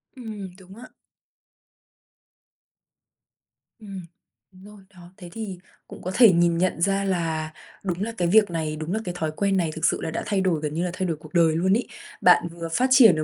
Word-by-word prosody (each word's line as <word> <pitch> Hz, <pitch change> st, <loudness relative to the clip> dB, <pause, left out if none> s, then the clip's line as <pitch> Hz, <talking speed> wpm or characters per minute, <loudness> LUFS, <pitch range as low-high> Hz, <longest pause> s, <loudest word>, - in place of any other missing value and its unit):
Ừm, 215 Hz, -6 st, -7 dB
đúng 190 Hz, +1 st, -14 dB
á. 245 Hz, +3 st, -11 dB, 2.9 s
Ừm, 195 Hz, -5 st, -9 dB, 0.5 s
đúng 185 Hz, 0 st, -18 dB
rồi. 210 Hz, -1 st, -14 dB
Đó, 175 Hz, -1 st, -15 dB
thế 180 Hz, -3 st, -10 dB
thì 215 Hz, -5 st, -6 dB, 0.3 s
cũng -, -, -11 dB
có 185 Hz, -, -4 dB
thể 235 Hz, -5 st, +8 dB
nhìn 170 Hz, -1 st, +2 dB
nhận 175 Hz, -1 st, 0 dB
ra 195 Hz, +1 st, +1 dB
là, 165 Hz, -4 st, -2 dB, 0.3 s
đúng 180 Hz, -1 st, -3 dB
là 230 Hz, -, -3 dB
cái 175 Hz, -, +1 dB
việc 205 Hz, 0 st, +4 dB
này, 155 Hz, -2 st, -2 dB
đúng 155 Hz, +3 st, -4 dB
là 220 Hz, -, 0 dB
cái 180 Hz, -1 st, -4 dB
thói 160 Hz, -2 st, -2 dB
quen 195 Hz, +1 st, +1 dB
này 170 Hz, -4 st, 0 dB
thực 160 Hz, -, -1 dB
sự -, -, +1 dB
là 160 Hz, -, -3 dB
đã -, -, -3 dB
thay 200 Hz, -2 st, 0 dB
đổi 175 Hz, -5 st, 0 dB
gần 150 Hz, -1 st, -3 dB
như 170 Hz, -, -1 dB
là -, -, -1 dB
thay 185 Hz, 0 st, -2 dB
đổi 165 Hz, -3 st, -2 dB
cuộc 155 Hz, +1 st, -15 dB
đời 165 Hz, -3 st, +4 dB
luôn 185 Hz, +4 st, +2 dB
ấy. 235 Hz, -, 0 dB, 0.3 s
Bạn -, -, +5 dB
vừa 170 Hz, 0 st, -7 dB
phát 250 Hz, +10 st, +1 dB
triển 230 Hz, -, +8 dB
được 155 Hz, -, -1 dB
180 Hz, 215 wpm, -24 LUFS, 165-200 Hz, 2.9 s, thể